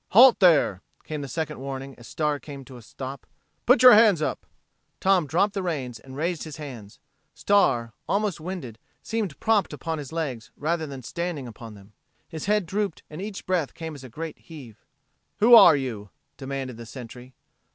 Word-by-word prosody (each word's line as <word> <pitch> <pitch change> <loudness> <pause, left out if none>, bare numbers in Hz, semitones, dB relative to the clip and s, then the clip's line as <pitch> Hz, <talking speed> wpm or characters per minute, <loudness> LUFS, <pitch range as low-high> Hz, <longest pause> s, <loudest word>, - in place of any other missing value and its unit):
"Halt 245 +3 +8
there!" 155 - +4 0.2
came 155 -1 -5
the 140 - -5
second 155 +2 -4
warning 135 0 -6
as 120 - -13
Star 150 -2 -1
came 140 -3 -10
to 130 - -12
a - - -12
stop. 130 +4 -8 0.4
"Put 250 +2 +5
your 250 -1 +11
hands 210 -5 +6
up!" 155 - -3 0.5
Tom 190 -5 +3
dropped 195 +7 +1
the 200 - -2
reins 135 -10 -4
and 130 +3 -12
raised 170 +2 -2
his 155 -2 -8
hands. 125 -9 -9 0.4
Star, 135 - +2 0.2
almost 200 -2 0
winded, 155 - -7 0.2
seemed 215 -9 -3
propped 215 -4 +1
upon 160 -2 -4
his 140 -3 -8
legs, 140 -9 -4
rather 160 +1 -1
than 135 -2 -8
standing 170 -1 -4
upon 115 -1 -10
them. 100 +1 -17 0.3
His 160 -2 -7
head 210 -1 +1
drooped 200 -1 -3
and 155 +4 -7
each 200 -1 -6
breath 180 -6 -1
came 160 -1 -6
as 140 -3 -11
a 130 - -10
great 160 +6 -7
heave. 130 -10 -13 0.5
"Who 235 +3 +5
are 225 -9 +10
you?" 115 -7 -4 0.3
demanded 135 -3 -5
the 115 -1 -10
Sentry. 125 +2 -11
150 Hz, 185 wpm, -25 LUFS, 130-180 Hz, 0.5 s, your